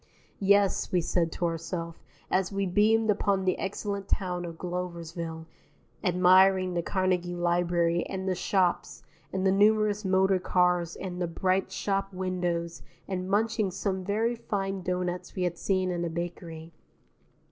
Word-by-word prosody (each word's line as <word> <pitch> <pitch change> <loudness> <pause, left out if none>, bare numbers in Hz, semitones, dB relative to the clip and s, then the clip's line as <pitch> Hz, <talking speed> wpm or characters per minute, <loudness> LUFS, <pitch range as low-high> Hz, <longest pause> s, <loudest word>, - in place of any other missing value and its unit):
Yes, 200 0 +3
we 180 - +3
said 165 0 0
to 175 - -2
ourself, 165 0 -4 0.3
as 185 0 +1
we 195 0 -1
beamed 215 +4 +3
upon 200 -2 0
the 185 - +1
excellent 200 0 -3
town 180 -3 -1
of 165 -1 -7
Gloversville, 170 -2 -5 0.6
admiring 185 0 +5
the 175 - 0
Carnegie 180 -1 0
Library 175 -1 +1
and 190 0 -4
the 190 - +2
shops 180 0 0 0.3
and 190 0 -1
the 190 - +4
numerous 210 +1 +3
motor 190 0 +3
cars 180 -2 +1
and 180 -1 -6
the 175 - 0
bright 185 +3 0
shop 195 -1 -1
windows 175 -2 -2 0.3
and 185 -1 -3
munching 215 0 +1
some 190 +1 -2
very 220 +5 0
fine 195 -4 -3
doughnuts 180 0 -3
we 185 - -1
had 175 -1 -2
seen 185 -2 0
in 175 -1 -2
a 170 - -1
bakery. 165 -1 -6
185 Hz, 145 wpm, -28 LUFS, 175-195 Hz, 0.6 s, admiring